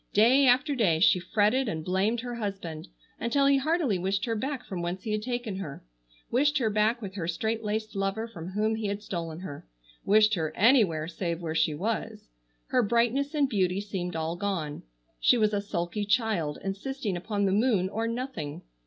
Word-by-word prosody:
Day 255 Hz, +6 st, +5 dB
after 260 Hz, +4 st, +4 dB
day 195 Hz, -11 st, +2 dB
she 180 Hz, +1 st, +5 dB
fretted 215 Hz, +7 st, +1 dB
and 160 Hz, -3 st, -4 dB
blamed 200 Hz, +6 st, +1 dB
her 245 Hz, 0 st, -5 dB
husband 195 Hz, -7 st, -5 dB, 0.3 s
until 275 Hz, +5 st, +2 dB
he 275 Hz, 0 st, +5 dB
heartily 285 Hz, -, +1 dB
wished 195 Hz, +3 st, 0 dB
her 230 Hz, -, -1 dB
back 260 Hz, +3 st, -3 dB
from 185 Hz, -4 st, -5 dB
whence 175 Hz, +2 st, -3 dB
he 220 Hz, -, -3 dB
had 215 Hz, 0 st, 0 dB
taken 240 Hz, -4 st, -3 dB
her; 150 Hz, -, -7 dB, 0.5 s
wished 290 Hz, +4 st, +3 dB
her 230 Hz, -6 st, +1 dB
back 215 Hz, +3 st, +1 dB
with 195 Hz, -2 st, -6 dB
her 180 Hz, -5 st, -4 dB
straitlaced 220 Hz, +3 st, -2 dB
lover 195 Hz, +3 st, -1 dB
from 180 Hz, -4 st, -8 dB
whom 215 Hz, +2 st, +1 dB
he 220 Hz, -1 st, -2 dB
had 200 Hz, +1 st, -3 dB
stolen 165 Hz, -3 st, -5 dB
her; 145 Hz, -, -8 dB, 0.4 s
wished 215 Hz, +1 st, +5 dB
her 160 Hz, -5 st, -1 dB
anywhere 200 Hz, -, +4 dB
save 170 Hz, -1 st, -3 dB
where 165 Hz, -2 st, -3 dB
she 160 Hz, -1 st, +1 dB
was. 210 Hz, -, -3 dB, 0.4 s
Her 255 Hz, -, +3 dB
brightness 240 Hz, +6 st, +1 dB
and 290 Hz, -2 st, +3 dB
beauty 190 Hz, -6 st, +1 dB
seemed 190 Hz, -4 st, -4 dB
all 160 Hz, +1 st, -2 dB
gone: 175 Hz, -6 st, -3 dB, 0.4 s
she 245 Hz, -, +5 dB
was 215 Hz, -2 st, +2 dB
a 205 Hz, -, +1 dB
sulky 200 Hz, +1 st, -3 dB
child 205 Hz, -8 st, 0 dB
insisting 205 Hz, +2 st, -3 dB
upon 200 Hz, +3 st, -1 dB
the 190 Hz, -, +2 dB
moon 205 Hz, -3 st, +2 dB
or 225 Hz, +4 st, -2 dB
nothing. 230 Hz, -, -4 dB
205 Hz, 190 wpm, -28 LUFS, 180-235 Hz, 0.5 s, Day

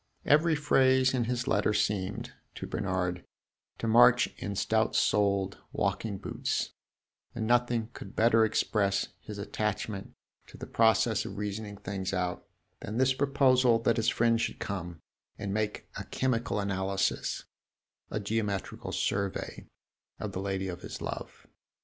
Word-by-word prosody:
Every 155 Hz, +2 st, +4 dB
phrase 130 Hz, -3 st, +4 dB
in 125 Hz, -3 st, +1 dB
his 125 Hz, +1 st, -2 dB
letter 105 Hz, 0 st, +2 dB
seemed, 100 Hz, -1 st, -1 dB, 0.2 s
to -, -, -5 dB
Bernard, 90 Hz, -2 st, -2 dB, 0.5 s
to -, -, -4 dB
march 120 Hz, +1 st, +7 dB
in 100 Hz, -1 st, -4 dB
stout 110 Hz, +3 st, +1 dB
soled 100 Hz, -2 st, +2 dB
walking 100 Hz, +1 st, -1 dB
boots, -, -, -2 dB, 0.6 s
and 110 Hz, -2 st, -2 dB
nothing 120 Hz, -1 st, +2 dB
could 100 Hz, -, -10 dB
better 115 Hz, 0 st, +5 dB
express 105 Hz, -2 st, +1 dB
his 105 Hz, -, -8 dB
attachment 105 Hz, -1 st, -3 dB, 0.3 s
to -, -, -13 dB
the -, -, -7 dB
process 110 Hz, -1 st, +3 dB
of 100 Hz, -, -7 dB
reasoning 105 Hz, 0 st, -4 dB
things 95 Hz, -1 st, -4 dB
out 90 Hz, -1 st, -2 dB, 0.3 s
than 105 Hz, +3 st, -5 dB
this 130 Hz, +1 st, +4 dB
proposal 130 Hz, -3 st, +4 dB
that 115 Hz, 0 st, +3 dB
his 115 Hz, -, +3 dB
friend 115 Hz, 0 st, +2 dB
should -, -, -2 dB
come 85 Hz, -4 st, -5 dB, 0.4 s
and 100 Hz, -1 st, -3 dB
make 105 Hz, 0 st, -2 dB
a -, -, -4 dB
chemical 125 Hz, -4 st, -1 dB
analysis 95 Hz, -1 st, -1 dB, 0.7 s
a 105 Hz, -, -2 dB
geometrical 105 Hz, -2 st, -2 dB
survey 100 Hz, -1 st, -2 dB, 0.5 s
of -, -, -4 dB
the 95 Hz, -, -4 dB
lady 95 Hz, -1 st, -2 dB
of 90 Hz, -2 st, -6 dB
his -, -, -7 dB
love. -, -, -6 dB
105 Hz, 140 wpm, -30 LUFS, 100-115 Hz, 0.7 s, march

